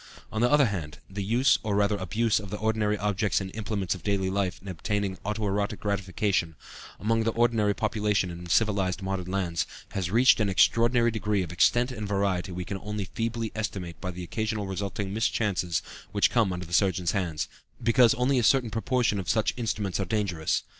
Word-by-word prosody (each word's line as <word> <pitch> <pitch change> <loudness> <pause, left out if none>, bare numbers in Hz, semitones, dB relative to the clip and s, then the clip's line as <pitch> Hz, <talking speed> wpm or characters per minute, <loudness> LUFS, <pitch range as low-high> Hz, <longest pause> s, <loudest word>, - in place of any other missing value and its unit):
On 110 - -2
the 120 - +4
other 145 0 +5
hand, 85 -9 -4
the 100 +1 -5
use, 120 +6 +3
or 105 -2 -1
rather 105 +1 +2
abuse, 110 +3 +1
of 105 -2 -8
the 105 - -4
ordinary 110 -1 0
objects 105 -1 0
and 95 0 -6
implements 105 -5 -2
of 90 - -9
daily 95 0 0
life 95 -2 -1
in 100 - -14
obtaining 95 +2 -2
auto 105 +1 -2
erotic 100 +1 -1
gratification, 100 -4 -1 0.4
among 115 +2 +1
the 115 - +1
ordinary 115 -3 +2
population 105 -3 0
in 85 0 -8
civilized 100 -2 +1
modern 95 -1 -3
lands, 90 -3 -1 0.2
has 95 -3 -2
reached 120 +6 +5
an 105 -2 +2
extraordinary 115 +4 +4
degree 105 -3 0
of 85 - -7
extent 120 +8 +3
and 110 -4 -5
variety 95 -2 0
we 90 0 -4
can 95 +1 -4
only 105 -1 -4
feebly 115 -1 -2
estimate 95 -6 -4
by 90 - -3
the 90 0 -6
occasional 110 +3 -2
resulting 95 +1 -3
mischances 100 -5 0 0.3
which 100 -1 +3
come 115 -6 +2
under 90 0 -4
the 85 - -10
surgeon's 90 -3 +2
hands, 85 -7 -2 0.4
because 115 0 +5
only 125 +2 +2
a - - 0
certain 125 -1 +3
proportion 115 -1 +1
of 90 - -4
such 110 - +2
instruments 105 -6 -2
are 100 - 0
dangerous. 90 -5 -1
100 Hz, 190 wpm, -27 LUFS, 95-110 Hz, 0.4 s, other